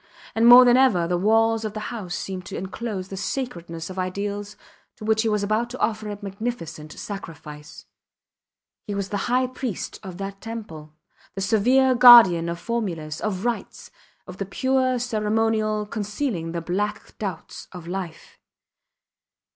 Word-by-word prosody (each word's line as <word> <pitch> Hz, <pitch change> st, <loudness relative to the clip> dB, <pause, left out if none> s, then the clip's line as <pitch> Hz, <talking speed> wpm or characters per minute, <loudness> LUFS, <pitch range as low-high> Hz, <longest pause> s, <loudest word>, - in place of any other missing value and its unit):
And 225 Hz, +1 st, +3 dB
more 245 Hz, +1 st, +10 dB
than 245 Hz, 0 st, +6 dB
ever 210 Hz, -11 st, +3 dB
the 175 Hz, -, 0 dB
walls 225 Hz, +4 st, +2 dB
of 215 Hz, -1 st, -4 dB
his 215 Hz, -, -4 dB
house 195 Hz, -8 st, -5 dB
seemed 185 Hz, -1 st, -5 dB
to -, -, -6 dB
enclose 190 Hz, 0 st, -5 dB
the 195 Hz, -, -6 dB
sacredness 170 Hz, -9 st, -4 dB
of 185 Hz, -, -6 dB
ideals 200 Hz, +2 st, -4 dB, 0.4 s
to 215 Hz, -, -10 dB
which 220 Hz, 0 st, +2 dB
he 225 Hz, -, 0 dB
was 210 Hz, -1 st, 0 dB
about 215 Hz, +4 st, 0 dB
to 250 Hz, -, -7 dB
offer 215 Hz, -1 st, -1 dB
a 205 Hz, -, -5 dB
magnificent 195 Hz, -7 st, -6 dB
sacrifice. 155 Hz, -6 st, -9 dB, 1.0 s
He 205 Hz, -, -3 dB
was 200 Hz, -1 st, -3 dB
the 205 Hz, -2 st, -2 dB
high 255 Hz, +1 st, +3 dB
priest 255 Hz, -5 st, -5 dB
of 190 Hz, -4 st, -9 dB
that 195 Hz, 0 st, -6 dB
temple, 165 Hz, -10 st, -8 dB, 0.4 s
the 195 Hz, -, -4 dB
severe 250 Hz, +6 st, +3 dB
guardian 235 Hz, -9 st, +8 dB
of 170 Hz, -, -3 dB
formulas, 170 Hz, -8 st, -4 dB
of 205 Hz, -1 st, -3 dB
rites, 240 Hz, -1 st, -4 dB, 0.3 s
of 185 Hz, 0 st, -10 dB
the 195 Hz, -, -3 dB
pure 260 Hz, +3 st, +1 dB
ceremonial 215 Hz, -2 st, 0 dB
concealing 205 Hz, -, -3 dB
the 170 Hz, 0 st, -3 dB
black 205 Hz, +5 st, -3 dB
doubts 190 Hz, -6 st, -6 dB
of 180 Hz, -3 st, -10 dB
life. 175 Hz, -3 st, -7 dB
205 Hz, 155 wpm, -24 LUFS, 185-230 Hz, 1.0 s, more